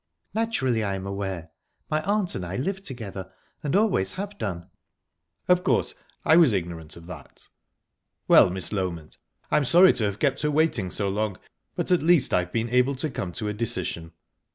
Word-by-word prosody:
"Naturally, 135 - 0
I 100 -2 -1
am 95 0 -6
aware. 95 -4 -4 0.4
My 155 0 0
aunt 200 0 0
and 90 - -4
I 90 +2 -5
live 190 +9 -2
together, 100 - -6 0.3
and 145 +1 -1
always 195 - +2
have 200 +2 -5
done." 85 -4 -4 0.8
"Of 180 0 +4
course, - - +1 0.3
I 160 - +6
was 160 -9 +6
ignorant 85 -4 -4
of 85 - -13
that...Well, 90 +1 -1
Miss 90 0 -3
Loment, 85 -6 -4 0.3
I - - +4
am 145 - +2
sorry 175 +7 +7
to 110 - 0
have 100 -1 -2
kept 140 +2 0
her 150 - +1
waiting 150 - +1
so 100 +2 -1
long, 100 -1 -1 0.4
but - - -2
at 180 - +4
least 165 -2 +3
I've 90 -1 +1
been 115 0 -1
able 125 +2 +3
to 140 +3 -3
come 90 - -4
to 105 +2 -4
a 105 - -2
decision. 85 -6 -2
110 Hz, 180 wpm, -25 LUFS, 95-155 Hz, 0.8 s, sorry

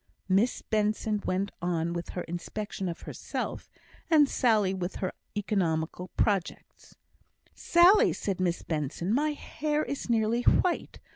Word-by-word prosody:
Miss 195 +6 +2
Benson 215 0 0
went 190 +2 0
on 170 -1 -1
with 175 0 -5
her 180 - -1
inspection 190 +3 -5
of 170 - -6
herself, - - -5 0.4
and 305 -3 +6
Sally 215 -8 +2
with 185 -1 -4
her 185 - -2 0.3
economical 180 -4 -1
projects. 195 -5 -2 0.6
"Sally!" 355 +5 +5
said 195 -3 -3
Miss 175 -2 0
Benson, 160 +5 -2
"my 300 +4 +1
hair 300 +1 -2
is 280 - -5
nearly 230 +1 +2
white. 350 +7 +1
200 Hz, 130 wpm, -28 LUFS, 175-240 Hz, 0.6 s, and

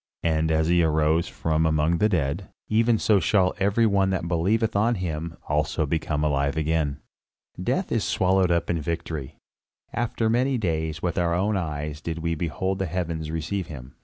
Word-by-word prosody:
And 80 -1 +1
as 80 0 +2
he 85 0 +4
arose 80 +1 +2
from 80 0 0
among 80 +2 +2
the 105 - +3
dead, 85 0 -1 0.2
even 115 +1 +3
so 105 -1 +3
shall 95 -2 +2
every 100 +4 +3
one 100 -3 +3
that 95 -3 -1
believeth 100 +7 +1
on 115 +4 +3
him 85 -3 -4
also 75 +1 0
become 75 0 -1
alive 70 0 +1
again. 80 -2 0 0.6
Death 130 - -1
is 115 -3 +1
swallowed 95 0 +2
up 85 -1 +1
in 85 -2 -1
victory. 80 -4 -4 0.6
After 115 -1 -1
many 125 +4 +2
days, 80 -6 -2
with 90 0 0
our 85 -1 +1
own 100 +4 +1
eyes 75 -4 -3
did 85 0 -4
we 85 0 -1
behold 90 +4 -2
the 95 - -1
heavens 80 -2 -3
receive 80 +4 -3
him. 65 -4 -9
85 Hz, 175 wpm, -25 LUFS, 80-95 Hz, 0.6 s, he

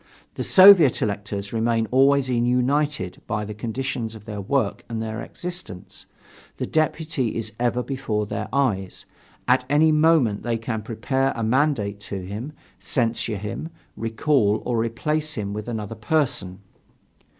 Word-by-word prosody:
The - - -4
Soviet 185 -8 +7
electors 100 -1 -3
remain 115 0 +1
always 135 +1 +4
united 125 -2 0
by 105 0 -2
the 105 - -6
conditions 115 +1 -4
of 105 -2 -12
their 105 -2 -5
work 135 +7 -1
and 115 -1 -3
their 110 0 -4
existence; 175 - -8 0.5
the - - -2
deputy 155 -5 -1
is 110 -2 -3
ever 120 0 +1
before 120 -6 -2
their 105 +1 -4
eyes, 105 -10 -1 0.4
at - - +4
any 155 +2 +4
moment 155 -9 +3
they 120 -1 -1
can 115 -1 -4
prepare 130 +5 -1
a 115 - -3
mandate 115 -4 +1
to 95 -2 -4
him, 105 +9 -6 0.3
censure 115 -3 -1
him, 115 +10 -5 0.3
recall 115 -1 +1
or 125 - -1
replace 150 +7 -1
him 100 -2 -3
with 105 +1 -5
another 110 -2 -4
person. 110 -6 -1
115 Hz, 140 wpm, -23 LUFS, 105-140 Hz, 0.5 s, Soviet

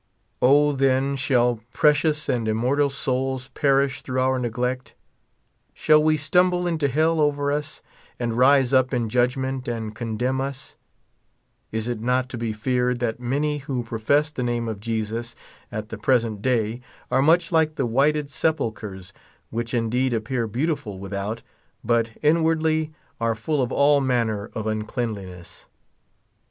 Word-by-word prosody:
O, 145 +3 +5
then, 135 0 +1
shall 125 -3 +2
precious 150 +2 +2
and 115 -3 0
immortal 125 +6 +1
souls 130 -1 -2
per 140 -1 +3
ish 140 -1 -4
through 130 0 -3
our 130 0 +2
neglect? 125 +1 -3 0.8
Shall 155 -1 +4
they 155 0 +3
stumble 180 +4 +2
into 160 -4 0
hell 160 +4 +1
over 145 -1 +1
us, 150 +1 -4 0.4
and 120 -2 -1
rise 130 +1 +4
up 130 0 +3
in 115 -2 -1
judgment 130 +2 0
and 115 -2 -3
condemn 120 +4 -2
us? 135 -1 -5 1.0
Is 110 +1 -3
it 120 -3 -3
not 125 +2 0
to 130 - -6
be 115 -1 -2
feared 125 +3 0
that 120 -1 -2
many 145 +4 -1
who 135 -3 -3
profess 130 +7 +1
the 135 - -5
name 120 -1 -1
of 110 -3 -4
Jesus 115 +1 -3 0.4
at 110 -2 -5
the 115 - -7
present 115 -4 +1
day 115 -1 0 0.3
are 130 +1 +3
much 165 +5 +3
like 160 -2 +2
the 135 - 0
whited 140 +4 +1
sepulchres, 110 - -2 0.4
which 115 0 -3
indeed 120 +2 0
appear 115 +1 -2
beautiful 130 - -2
witliout, 100 +3 -4 0.4
but 115 0 +1
inwardly 160 0 +2 0.3
are 115 -1 0
full 140 +6 -1
of 125 - -1
all 145 0 +4
manner 115 -5 0
of 110 - -3
uncleauliness 105 -5 -5
125 Hz, 145 wpm, -23 LUFS, 115-145 Hz, 1.0 s, O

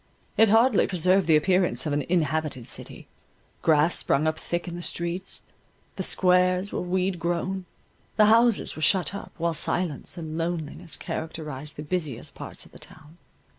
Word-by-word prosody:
It 225 -1 +5
hardly 225 +1 +4
preserved 185 0 +2
the 160 - +5
appearance 175 -5 +2
of 150 - -1
an 145 - +1
inhabited 155 -6 0
city; - - -5 0.5
grass 155 +1 +3
sprung 145 +3 +1
up 155 0 0
thick 175 +1 -3
in 175 - -5
the 175 - -6
streets; 175 +2 -4 0.5
the - - -4
squares 180 +1 +2
were - - -2
weed 180 0 -1
grown, 175 +3 -2 0.5
the 215 - +7
houses 230 +1 +3
were 155 - -7
shut 185 +4 +3
up, 200 - -7
while 170 -1 0
silence 170 -1 -1
and 160 -1 -5
loneliness 165 -2 -4
characterized 150 -3 -6
the 150 - -6
busiest 155 -7 -2
parts - - -6
of - - -18
the - - -14
town. 160 +2 -14
170 Hz, 165 wpm, -26 LUFS, 155-185 Hz, 0.5 s, the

